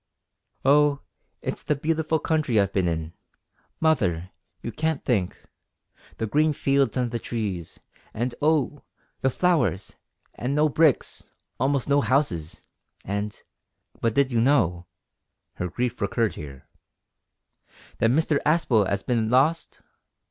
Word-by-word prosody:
"Oh! 145 +1 +4 0.4
it's - - -3
the 150 - 0
beautiful 160 +2 0
country 150 -7 +1
I've 100 -1 +1
been 95 -3 +1
in. 80 -1 -3 0.7
Mother, 95 - +1 0.3
you - - -4
can't 160 -2 -2
think 100 -8 0 0.8
the 115 - -1
green 150 +7 +2
fields 135 -3 +1
and 125 -2 0
the 120 - -2
trees, 100 -8 -4 0.3
and, 120 +2 -2
oh! 150 -1 +1 0.4
the 135 - +3
flowers, 125 - +1 0.4
and 130 +4 -3
no 150 +1 +3
bricks 155 -1 +1 0.3
almost 135 -1 +1
no 145 0 +3
houses 110 - -1 0.4
and 100 +2 -4 0.6
But 115 -1 0
did 140 -1 +3
you 115 -2 +2
know" 90 - +2 0.7
her 90 - -2
grief 120 +5 -3
recurred 100 0 0
here 70 -4 -10 1.3
"that 115 - +3
Mr 150 +2 +2
Aspel 130 - +3
'as 100 0 -1
bin 115 -3 0
lost? 145 +7 +1
125 Hz, 125 wpm, -25 LUFS, 100-150 Hz, 1.3 s, Oh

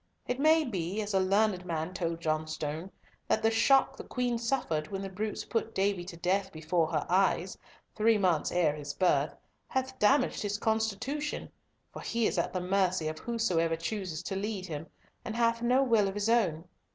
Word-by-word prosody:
It 250 +1 -2
may 315 +2 +5
be, 190 -4 -3
as 205 0 -4
a 190 - +4
learned 195 0 +2
man 165 0 -3
told 170 -2 -2
Johnstone, 155 +1 -2 0.4
that - - +1
the 225 - +4
shock 270 +4 +4
the - - -7
Queen 245 -2 -1
suffered 230 - -1
when 195 -1 -4
the 195 - -5
brutes 210 +3 -3
put 225 -1 -2
Davy 195 -2 +1
to 175 -2 -8
death 190 +3 0
before 160 0 0
her 155 -2 -1
eyes, 185 0 +2 0.4
three 220 +1 +4
months 180 -6 +1
ere 165 -4 +2
his 145 -1 -6
birth, 185 -2 +2 0.3
hath 260 0 -2
damaged 255 +5 +3
his 205 -1 -1
constitution, 220 +7 -2 0.4
for - - -7
he 230 -1 0
is - - +1
at - - 0
the 185 - -2
mercy 185 -3 +1
of 155 0 -6
whosoever 180 -9 0
chooses 180 -1 -4
to 195 - -4
lead 200 -1 -3
him, 160 -2 -6 0.4
and 220 - -5
hath 230 0 +2
no 250 +3 +3
will 225 -6 +3
of 195 - -4
his 205 +2 0
own. 180 -8 +2
195 Hz, 190 wpm, -30 LUFS, 170-225 Hz, 0.4 s, may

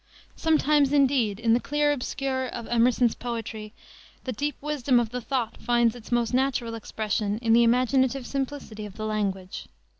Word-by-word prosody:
Sometimes, 300 -3 +3
indeed, 260 -8 +2
in 230 -1 +2
the 235 - +4
clear 295 +2 +1
obscure 265 -1 -2
of 235 -1 -6
Emerson's 240 0 +3
poetry 225 -3 -6 0.5
the 255 - -3
deep 290 +5 -2
wisdom 280 -4 +1
of 230 -2 -2
the 250 0 -4
thought 240 -3 -2
finds 240 0 +2
its 240 -1 -12
most 240 0 +1
natural 255 -3 0
expression 215 -1 -2
in 225 -1 +1
the 235 - +6
imaginative 255 +2 +2
simplicity 265 -6 -4
of 200 - -13
the 215 - -4
language. 195 -3 -3
240 Hz, 160 wpm, -26 LUFS, 225-270 Hz, 0.5 s, the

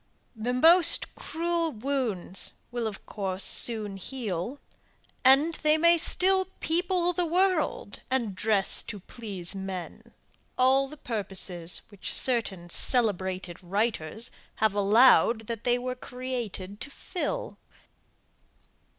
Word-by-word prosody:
The 230 +3 -3
most 330 +6 +5
cruel 335 0 -2
wounds 225 -7 -2 0.2
will 240 -2 -2
of 205 -3 -8
course 195 -2 -2
soon 215 -4 +2
heal, 220 +2 -5 0.6
and 275 +5 +5
they 305 0 +3
may 340 +1 +4
still 375 +3 +3
people 355 +1 0
the 350 -1 -1
world, 350 - -1
and 240 -6 -1
dress 200 0 +2
to 205 - -8
please 195 -3 -5
man 190 -2 -7 0.5
all 265 +2 +3
the 305 +3 -12
purposes 190 -7 -1
which 205 -3 -2
certain 220 -9 +2
celebrated 190 -5 0
writers 205 +1 -2 0.2
have 220 -1 +1
allowed 225 +2 +4
that 230 0 -6
they 245 0 +2
were 250 +1 -4
created 245 -6 -6
to - - -7
fill. 375 - -5
235 Hz, 115 wpm, -27 LUFS, 195-280 Hz, 0.6 s, most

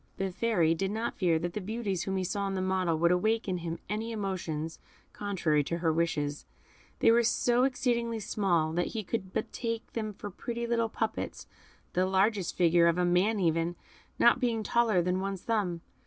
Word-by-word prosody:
The 195 0 -1
Fairy 180 -6 +2
did 190 +4 -1
not 220 +3 -2
fear 170 -4 +3
that 170 +2 -3
the 210 - -3
beauties 200 -3 -2
whom 195 0 -1
he 190 - 0
saw 200 +2 -1
in 195 - -2
the 185 - -1
model 185 -3 +1
would 170 +2 +3
awake 215 +5 +1
in 185 -2 -1
him 170 0 -4
any 220 +3 -3
emotions 175 -7 -3 0.3
contrary 170 -8 0
to 170 - -2
her 165 -2 +1
wishes; 150 -3 -1 0.5
they - - +5
were 235 +1 +5
so 240 +2 +2
exceedingly 235 -3 0
small, 175 -7 0
that 175 +1 0
he 215 - -2
could 190 -2 -4
but 220 - -3
take 230 -1 -4
them 215 -2 -2
for 205 +1 -7
pretty 235 +5 -4
little 230 -1 +1
puppets, 220 0 -3 0.5
the 185 +1 +2
largest 195 0 +1
figure, 170 -1 +5
of 170 0 +2
a 180 - +2
man 185 +5 +2
even, 165 -1 +1 0.4
not 235 - +5
being 230 -3 0
taller 220 -6 +2
than 180 +1 0
one's 195 -1 -3
thumb. 195 -7 -1
190 Hz, 195 wpm, -30 LUFS, 175-225 Hz, 0.5 s, they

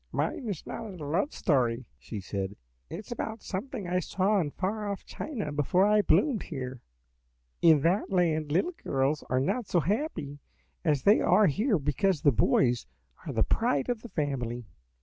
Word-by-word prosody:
"Mine 250 - -2
is 190 -7 -4
not 200 -5 -7
a 150 - -6
love 175 - 0
story," 125 -5 +1
she 100 - -6
said; 95 +1 -4 0.3
"it - - -5
is - - -14
about 220 -2 -4
something 200 0 -4
I 180 +1 +1
saw 195 +4 +1
in 160 -5 0
far 205 +6 -3
off 200 - -6
China 220 - -5
before 150 +6 +2
I 210 0 +4
bloomed 255 +1 +3
here. 130 -5 -6 0.8
"In 160 -4 +6
that 175 +7 +1
land 160 -5 +1
little 335 - +1
girls 135 +3 0
are 130 - +2
not 210 - -1
so 175 - +2
happy 170 - -2 0.4
as 145 -5 +1
they 205 +2 +6
are 215 - +5
here 205 - +2
because 155 +4 0
the 145 - +6
boys 125 - +2 0.4
are - - -2
the - - +3
pride 140 - +1
of 240 -3 -1
the 240 - -9
family. 125 - -2
170 Hz, 175 wpm, -29 LUFS, 140-205 Hz, 0.8 s, In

